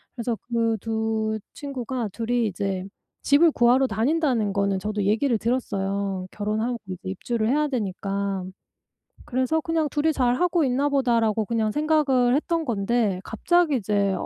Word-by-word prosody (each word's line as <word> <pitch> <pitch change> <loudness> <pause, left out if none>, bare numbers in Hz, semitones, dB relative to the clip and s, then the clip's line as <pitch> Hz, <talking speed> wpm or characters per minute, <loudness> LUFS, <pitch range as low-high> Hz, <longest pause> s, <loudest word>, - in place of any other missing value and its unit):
그래서 235 -1 -2 0.2
그 230 -1 +1
2 220 -1 -1 0.2
친구가 255 -4 -4
2 230 0 -4
이 240 -2 +2
이제 190 -1 -3 0.4
집을 310 +4 +5
구하러 250 +1 +4
다닌다는 245 -1 +1
거는 200 -1 +1
저도 210 +1 -2
얘기를 225 +5 +2
들었어요. 200 -5 -2
결혼하고 220 +4 -2
이제 185 -1 -5
입주를 215 +4 -2
해야 300 +3 +2
되니까. 200 -5 -2 0.8
그래서 260 +6 0
그냥 325 -1 0
'2 295 0 -1
이 320 - +4
잘하고 300 +7 +2
있나 270 +2 +1
보다.'라고 230 -6 +2
그냥 220 -1 0
생각을 285 -4 +2
했던 330 +2 0
건데 215 -3 0
갑자기 335 +7 +1
이제 200 -2 0
235 Hz, 305 characters per minute, -24 LUFS, 205-275 Hz, 0.8 s, 집을